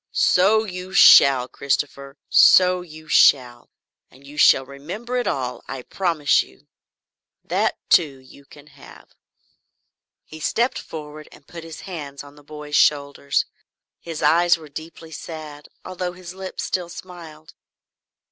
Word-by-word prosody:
"So 210 +4 +3
you 185 -2 -8
shall, 135 -8 +7
Christopher, 140 +1 -4
so 180 -1 +5
you 155 -2 -13
shall! 125 -5 +3 0.4
And 135 +2 -20
you 145 +1 -13
shall 135 -2 +4
remember 175 - -8
it 245 - -2
all, 125 -2 -3
I 135 -2 -7
promise 165 -4 +1
you. - - -16 0.8
That - - -1
too, 150 -6 +3
you 130 +2 -18
can 145 +1 -17
have." 140 -2 -17 1.1
He 155 - -12
stepped 235 - -1
forward 155 -1 -10
and 145 - -18
put 170 +1 -11
his 165 -2 -10
hands 145 -7 -8
on 145 0 -15
the 145 0 -19
boy's 150 0 -8
shoulders. 140 -1 +1 0.5
His 165 -2 -7
eyes 175 +1 +3
were 155 -2 -14
deeply 160 +2 -11
sad 155 -2 -9 0.2
although 180 -1 -5
his 180 0 -11
lips 190 0 -7
still 180 -2 -3
smiled. 165 -4 -12
155 Hz, 140 wpm, -21 LUFS, 140-180 Hz, 1.1 s, shall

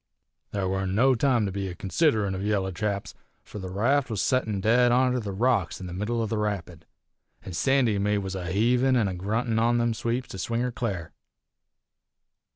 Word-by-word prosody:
"There 100 -2 -2
warn't 95 0 -1
no 130 +5 +5
time 125 -3 +2
to 100 - -2
be 100 0 -3
a 90 - -6
considerin' 105 - +1
of 95 - -4
yaller 100 -2 0
chaps, 100 +1 -3 0.3
fur 105 - -9
the 95 -1 -6
raft 125 +9 +1
was 110 -3 -2
settin' 110 -6 +1
dead 120 +4 +4
onter 125 0 +3
the 105 -3 -5
big 95 0 -6
rocks 115 -8 +1
in 95 - -7
the 90 - -6
middle 110 +5 -1
o' - - 0
the 110 0 -2
rapid, 90 -6 -4 0.6
an' 90 - -8
Sandy 125 +6 +2
an' - - -1
me 105 +1 +1
was 95 -1 -3
a 95 -2 -4
heavin' 125 +6 +3
an' 115 -5 +2
a 95 - -3
gruntin' 110 +5 -1
on 120 +1 +3
them 120 -1 +1
sweeps 120 +3 -2
to 95 - -7
swing 115 +5 -1
her 125 0 -1
cl'ar. 100 -9 -4
105 Hz, 210 wpm, -26 LUFS, 95-120 Hz, 0.6 s, no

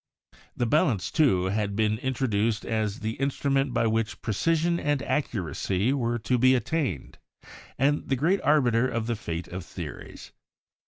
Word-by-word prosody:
The 120 - +1
balance, 115 - +1
too, 95 - +3
had 105 -1 -1
been 110 0 +1
in 130 0 -2
troduced 110 -3 0
as 110 -1 -2
the 110 0 -3
instrument 135 0 0
by 115 - +1
which 110 -1 -1
precision 165 - +1
and 145 -2 0
accu 125 - -1
racy 95 - 0
were 120 -3 0
to 120 +3 0
be 130 +2 +5
attained, 125 - -2 0.6
and 145 +3 +1
the 135 - +2
great 170 +9 +1
arbiter 130 -5 +3
of 115 -2 -2
the 120 0 -1
fate 85 -5 -5
of 90 0 -6
theories. 85 -4 -9
115 Hz, 160 wpm, -26 LUFS, 105-135 Hz, 0.6 s, be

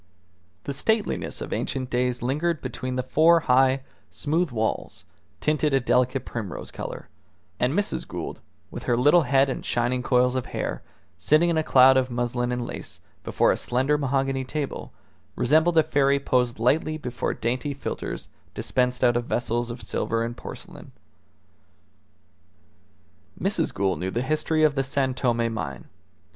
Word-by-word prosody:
The 140 - -4
stateliness 140 - -1
of - - -4
ancient 130 -1 -3
days 125 0 0
lingered 150 +6 0
between 130 0 -4
the 130 - -1
four 160 +6 +4
high, 130 0 +3 0.3
smooth 160 +3 -1
walls, 110 -3 -3 0.3
tinted 150 -2 +1
a - - +4
delicate 125 +1 +1
primrose 105 -6 -6
colour; - - -7 0.5
and 125 +2 +1
Mrs. 205 +4 -1
Gould, - - -6 0.3
with - - -6
her 120 - +2
little 145 +8 +5
head 135 -1 +3
and 130 - -4
shining 120 +1 0
coils 125 0 +2
of 130 - -2
hair, - - -3 0.4
sitting 155 +3 +4
in 165 - 0
a - - +3
cloud 130 -3 +6
of 130 -1 +1
muslin 120 0 -1
and 125 -1 -2
lace - - -7 0.2
before - - +2
a - - +1
slender 130 +4 +1
mahogany 135 -1 0
table, 145 +2 -4 0.4
resembled 160 +6 +3
a 160 - +7
fairy 140 -2 +2
posed 125 -3 +1
lightly 155 +7 +1
before 125 -6 -3
dainty 125 +5 -2
philtres 140 - -5 0.3
dispensed 125 0 0
out 120 -1 +4
of 120 0 0
vessels 120 0 -1
of 120 +1 -7
silver 115 0 -1
and 120 +1 -4
porcelain. - - -10 2.5
Mrs. - - 0
Gould 95 -1 -1
knew 95 - -2
the 120 +6 -2
history 155 +2 +1
of 155 -2 +4
the 135 -1 0
San 135 -1 0
Tome 120 -3 0
mine. 80 -10 -6
130 Hz, 155 wpm, -25 LUFS, 120-145 Hz, 2.5 s, a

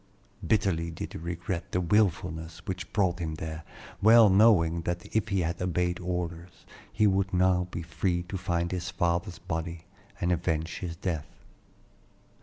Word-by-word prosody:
Bitterly 95 -6 +1
did 80 - -6
he - - -6
regret 85 +2 -4
the 90 - +2
wilfulness 80 -4 0
which 95 0 -5
brought 95 -3 +1
him 80 -2 -3
there, 80 +1 -5 0.4
well 110 0 +8
knowing 95 -5 +5
that 85 +1 -3
if 110 -2 +2
he 100 -2 +1
had 85 +1 -2
obeyed 90 -1 0
orders 90 0 -5 0.3
he 110 - +2
would 95 -1 +2
now 90 -1 +3
be 85 - -5
free 85 +2 -1
to 90 +3 -7
find 85 -2 -1
his 90 -1 -3
father's 85 0 -1
body 80 +1 -5 0.3
and 90 -2 +1
avenge 80 -1 -1
his 85 -3 -5
death. 80 -4 -3
90 Hz, 155 wpm, -28 LUFS, 85-95 Hz, 0.4 s, well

